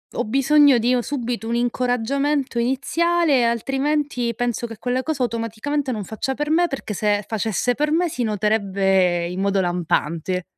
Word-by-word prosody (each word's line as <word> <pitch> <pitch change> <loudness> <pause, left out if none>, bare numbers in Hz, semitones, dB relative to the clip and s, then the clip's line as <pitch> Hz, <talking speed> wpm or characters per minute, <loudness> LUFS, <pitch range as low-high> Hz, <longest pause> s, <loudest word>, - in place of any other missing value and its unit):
ho - - -1
bisogno 275 +3 +4
di 240 +2 +2
o 250 - +2
subito 240 -4 -4
un 235 - -1
incoraggiamento 250 +3 0
iniziale, 280 +2 +1
altrimenti 265 +1 -1
penso 240 0 -2
che 225 - -9
quella 250 +3 -1
cosa 285 -3 -2
automaticamente 235 +5 -2
non 215 -4 -3
faccia 245 +7 -4
per 295 +2 -2
me, 345 +2 +3
perché 270 -7 -5
se 205 0 0
facesse 220 +2 0
per 300 +4 -1
me 340 +2 +2
si 255 - -5
noterebbe 195 -5 +1
in 180 +2 -5
modo 200 0 +1
lampante. 175 0 -1
240 Hz, 160 wpm, -21 LUFS, 210-280 Hz, -, bisogno